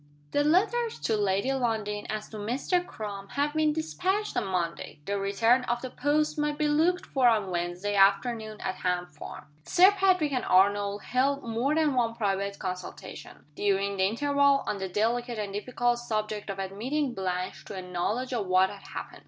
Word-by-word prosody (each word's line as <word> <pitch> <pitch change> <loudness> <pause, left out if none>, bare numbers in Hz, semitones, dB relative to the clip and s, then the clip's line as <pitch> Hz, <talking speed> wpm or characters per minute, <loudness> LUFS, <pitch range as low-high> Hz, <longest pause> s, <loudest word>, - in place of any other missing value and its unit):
THE 290 - +2
letters 440 +9 +2
to 225 - +1
Lady 200 +5 +1
Lundie 220 -5 -1
and 215 0 -2
to 220 - -10
Mr. 255 - 0
Crum 205 - -7
having 295 +2 +1
been 300 - +2
dispatched 375 +6 -1
on - - 0
Monday, 170 -4 -3
the 200 0 -1
return 225 +6 +3
of 240 +1 -2
the 255 - -5
post 300 +2 0
might 295 0 0
be 300 - +1
looked 325 +5 +2
for 260 -3 +2
on 215 -5 +2
Wednesday 175 +3 -2
afternoon 215 +2 +2
at 185 - -3
Ham 180 -1 -1
Farm. - - -10 0.2
Sir 370 - +6
Patrick 375 -6 +2
and 255 -3 -1
Arnold 200 +2 +3
held 275 +3 +1
more 235 +6 0
than 310 -3 +2
one 235 -3 +1
private 200 -2 -1
consultation, 185 -2 -7
during 200 +2 0
the 190 - +3
interval, 280 +5 +2
on 200 - -2
the 190 -1 -3
delicate 235 +4 0
and 205 -2 -4
difficult 240 +3 0
subject 215 -3 -3
of 195 - -4
admitting 240 +9 -2
Blanche 185 -2 -3
to 205 - -8
a 190 - -4
knowledge 210 +9 -2
of 215 -5 -1
what 185 +1 +4
had 200 - -10
happened. - - -7
220 Hz, 180 wpm, -28 LUFS, 195-280 Hz, 0.2 s, Sir